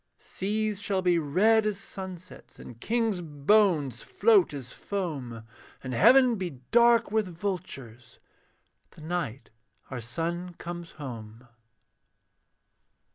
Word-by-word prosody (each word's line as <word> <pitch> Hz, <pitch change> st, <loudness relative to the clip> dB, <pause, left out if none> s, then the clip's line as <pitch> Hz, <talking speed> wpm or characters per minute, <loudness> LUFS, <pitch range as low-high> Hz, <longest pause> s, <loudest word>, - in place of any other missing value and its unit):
Seas 210 Hz, +1 st, -2 dB
shall 195 Hz, -2 st, -1 dB
be 175 Hz, -2 st, +3 dB
red 210 Hz, +9 st, +3 dB
as 210 Hz, -2 st, -1 dB
sunsets, 190 Hz, -2 st, -9 dB
And 115 Hz, -1 st, -12 dB
kings' 225 Hz, -5 st, 0 dB
bones 150 Hz, -, +2 dB
float 205 Hz, -6 st, +3 dB
as 135 Hz, -4 st, -7 dB
foam, 140 Hz, -, -4 dB, 0.4 s
And 130 Hz, -1 st, -4 dB
heaven 245 Hz, -, +6 dB
be 175 Hz, -9 st, -5 dB
dark 235 Hz, -1 st, +5 dB
with 215 Hz, -2 st, +1 dB
vultures, 165 Hz, -, -6 dB, 0.7 s
The -, -, -16 dB
night 155 Hz, -6 st, -4 dB, 0.4 s
our 125 Hz, -2 st, -4 dB
son 170 Hz, +8 st, -4 dB
comes 170 Hz, 0 st, -7 dB
home. 115 Hz, -3 st, -9 dB
175 Hz, 110 wpm, -28 LUFS, 135-205 Hz, 0.7 s, heaven